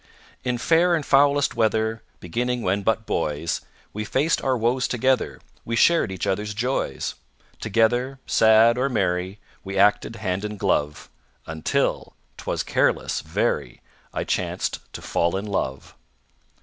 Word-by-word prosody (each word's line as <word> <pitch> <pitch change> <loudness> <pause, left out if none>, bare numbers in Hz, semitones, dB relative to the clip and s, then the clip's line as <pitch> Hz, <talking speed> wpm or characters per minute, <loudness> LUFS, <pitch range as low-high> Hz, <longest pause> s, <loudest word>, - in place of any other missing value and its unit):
In 125 -1 -1
fair 170 +7 +3
and 155 -4 -2
foulest 140 0 +4
weather, 110 0 0 0.2
Beginning 120 +7 -2
when 100 +2 +1
but 110 +2 0
boys, 75 -1 -2 0.3
We 105 - -3
faced 140 +9 +1
our 130 -2 +1
woes 120 +3 +1
together, 130 +1 0 0.2
We 115 - -3
shared 165 - +4
each 95 - -4
other's 105 +2 -2
joys. 125 +5 -2 0.5
Together, 120 +5 +1
sad 110 +2 +5
or 135 +2 +1
merry, 95 -4 -1 0.3
We 95 0 -5
acted 105 +3 +3
hand 100 -3 -2
in 105 0 -4
glove, 75 -5 -1 0.3
Until 80 0 -1 0.2
'twas - - -3
careless, - - +1
very - - -2 0.3
I - - -2
chanced - - -2
to - - -8
fall 85 +2 0
in 100 - -4
love. 70 -10 -3
110 Hz, 135 wpm, -24 LUFS, 95-125 Hz, 0.5 s, sad